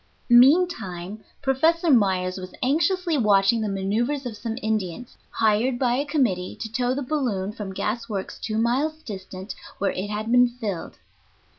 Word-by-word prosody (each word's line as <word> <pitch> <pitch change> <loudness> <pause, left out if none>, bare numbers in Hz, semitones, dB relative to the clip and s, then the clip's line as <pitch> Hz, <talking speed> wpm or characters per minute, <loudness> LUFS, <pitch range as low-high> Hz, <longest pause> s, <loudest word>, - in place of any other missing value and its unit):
Meantime 240 - +3 0.2
Professor 320 +5 +2
Myers 190 -6 +2
was 185 0 -9
anxiously 325 +4 +1
watching 210 +1 +3
the 215 - -1
manoeuvers 225 +9 -1
of 235 -3 -5
some 225 +1 -5
Indians 215 +1 -3
hired 225 +3 +1
by 245 -1 +1
a 285 - -1
committee 245 - 0
to 220 - -5
tow 245 +2 0
the 285 - -2
balloon 245 -9 -1
from 210 -3 -6
gas 215 +5 -3
works 195 -3 -5
two 215 -1 -3
miles 280 +8 0
distant, 190 -1 -7 0.2
where 195 -1 0
it 195 +2 -4
had 215 +2 -3
been 245 0 +6
filled. 225 -8 -5
225 Hz, 155 wpm, -24 LUFS, 195-265 Hz, 0.2 s, been